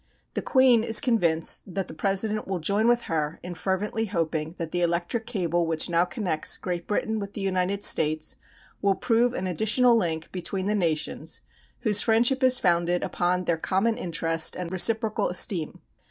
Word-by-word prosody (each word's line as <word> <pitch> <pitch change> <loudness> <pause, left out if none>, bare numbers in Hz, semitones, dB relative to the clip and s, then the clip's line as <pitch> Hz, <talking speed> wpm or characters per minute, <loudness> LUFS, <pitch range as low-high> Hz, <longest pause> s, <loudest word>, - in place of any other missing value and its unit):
The - - -3
Queen 255 -4 +3
is 225 -2 +7
convinced 180 - 0
that 195 -1 -2
the - - -9
President 210 +2 0
will 190 -1 -2
join 200 +7 +1
with 240 0 +2
her 155 -1 -3
in 180 0 -6
fervently 200 +5 -2
hoping 165 -4 -3
that 165 -2 -5
the 175 - -1
electric 175 +6 -1
cable 175 -7 -1
which 160 +1 -2
now 170 +1 +3
connects 180 -6 -1
Great 175 -2 -5
Britain 220 +1 -2
with 200 0 -7
the 205 - -5
United 195 +1 -1
States 155 0 +3 0.4
will 200 -1 +2
prove 240 +1 +1
an 185 - -3
additional 220 +7 +2
link 165 -7 -2
between 190 +1 -4
the 210 - 0
nations 165 -7 -2 0.4
whose 210 -4 +4
friendship 240 +4 +2
is 255 -1 +5
founded 175 -1 +1
upon 180 +1 -1
their 170 -1 0
common 195 +7 0
interest 165 -3 0
and 180 0 -6
reciprocal 220 +3 +1
esteem. 180 -2 0
190 Hz, 170 wpm, -25 LUFS, 170-220 Hz, 0.4 s, is